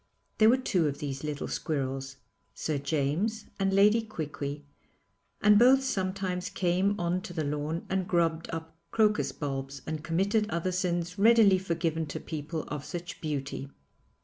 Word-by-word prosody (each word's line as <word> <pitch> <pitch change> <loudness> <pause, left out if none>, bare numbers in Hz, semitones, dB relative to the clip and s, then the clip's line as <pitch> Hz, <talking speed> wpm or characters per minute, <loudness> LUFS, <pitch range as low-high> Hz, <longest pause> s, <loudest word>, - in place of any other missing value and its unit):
There 220 0 +7
were 250 - +5
two 190 -11 +1
of 140 -1 -2
these 140 -2 -5
little 150 -1 -3
squirrels, 135 -3 -3 0.4
Sir 150 -3 -2
James 155 +10 -1
and 195 0 +2
Lady 205 +4 +5
Quiqui, 150 -8 -5 0.8
and 210 -1 +7
both 265 +3 +6
sometimes 185 -5 -2
came 185 +3 +1
on 175 +1 0
to 175 - -8
the 160 -2 -1
lawn 150 +3 -2
and 190 -1 -1
grubbed 165 -2 +1
up 160 0 -6
crocus 215 -2 +2
bulbs 135 -1 -5
and 155 -1 -4
committed 200 +6 +1
other 170 0 -1
sins 180 0 -1
readily 215 -3 +6
forgiven 165 -3 -1
to 145 - -5
people 155 +1 -4
of 145 -1 -5
such 175 -1 -7
beauty. 140 -3 -3
170 Hz, 150 wpm, -29 LUFS, 150-195 Hz, 0.8 s, There